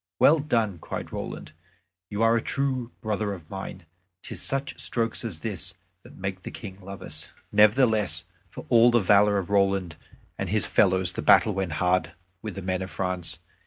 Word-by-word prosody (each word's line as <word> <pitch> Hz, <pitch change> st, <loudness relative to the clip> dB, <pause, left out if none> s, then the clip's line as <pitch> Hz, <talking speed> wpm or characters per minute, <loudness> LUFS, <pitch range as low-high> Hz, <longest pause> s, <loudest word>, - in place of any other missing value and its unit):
"Well 160 Hz, +2 st, +6 dB
done!" 115 Hz, -, 0 dB
cried -, -, -6 dB
Roland; -, -, -6 dB, 0.6 s
"you 105 Hz, +2 st, -1 dB
are 115 Hz, 0 st, +5 dB
a 115 Hz, -, +1 dB
true 130 Hz, -3 st, -1 dB
brother 105 Hz, -1 st, -1 dB
of 85 Hz, -5 st, -11 dB
mine. 95 Hz, -2 st, -7 dB, 0.4 s
'Tis -, -, -5 dB
such 135 Hz, 0 st, 0 dB
strokes 115 Hz, -1 st, -1 dB
as 95 Hz, -9 st, -5 dB
this 90 Hz, -5 st, -3 dB, 0.3 s
that -, -, -15 dB
make 95 Hz, -1 st, -4 dB
the -, -, -7 dB
King 100 Hz, -3 st, -9 dB
love 100 Hz, 0 st, -9 dB
us." -, -, -6 dB, 0.2 s
Nevertheless, 105 Hz, -, +4 dB, 0.3 s
for -, -, -10 dB
all 120 Hz, 0 st, +6 dB
the 120 Hz, 0 st, +4 dB
valor 100 Hz, +1 st, +4 dB
of 95 Hz, 0 st, -3 dB
Roland 95 Hz, -4 st, +1 dB, 0.4 s
and -, -, -2 dB
his -, -, +1 dB
fellows 95 Hz, -1 st, +3 dB
the -, -, -3 dB
battle 105 Hz, -, +5 dB
went 95 Hz, -4 st, -2 dB
hard 90 Hz, 0 st, +1 dB, 0.3 s
with 105 Hz, -4 st, -6 dB
the 100 Hz, -, -6 dB
men 95 Hz, 0 st, -1 dB
of 95 Hz, -, -4 dB
France. 90 Hz, -3 st, -3 dB
100 Hz, 180 wpm, -26 LUFS, 90-115 Hz, 0.6 s, Well